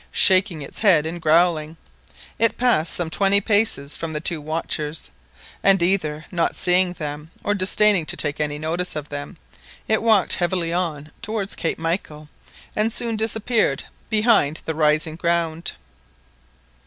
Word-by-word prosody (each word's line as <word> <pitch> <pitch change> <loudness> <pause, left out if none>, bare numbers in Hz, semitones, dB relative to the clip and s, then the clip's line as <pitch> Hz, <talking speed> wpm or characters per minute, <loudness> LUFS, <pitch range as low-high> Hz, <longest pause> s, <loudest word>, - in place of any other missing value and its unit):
Shaking 185 -5 +3
its - - -5
head 175 -8 +4
and 170 +2 -5
growling, 160 -1 +2 0.6
it 230 0 +2
passed 230 -10 +2
some 170 -2 -1
twenty 200 +3 +3
paces 205 -9 0
from 165 -1 -5
the 150 - -2
two 160 0 -2
watchers, 155 0 -4 0.5
and, 195 -1 +5
either 160 -4 0
not 170 -2 0
seeing 180 0 +4
them 150 -2 -7
or 205 - +1
disdaining 200 -2 +2
to - - -1
take 150 -1 -2
any 150 -1 -1
notice 165 +4 -3
of 150 -1 -6
them, 145 +5 -7 0.5
it 220 -1 +2
walked 220 -4 +3
heavily 175 -1 -1
on 155 -4 -3
towards 215 -2 -3
Cape 165 - -2
Michael, 160 -2 -4 0.5
and 215 +2 +1
soon 230 0 0
disappeared 220 - 0 0.3
behind 210 -9 +2
the 160 - -2
rising 155 +1 +1
ground. 170 -1 -1
170 Hz, 145 wpm, -22 LUFS, 155-200 Hz, 0.6 s, and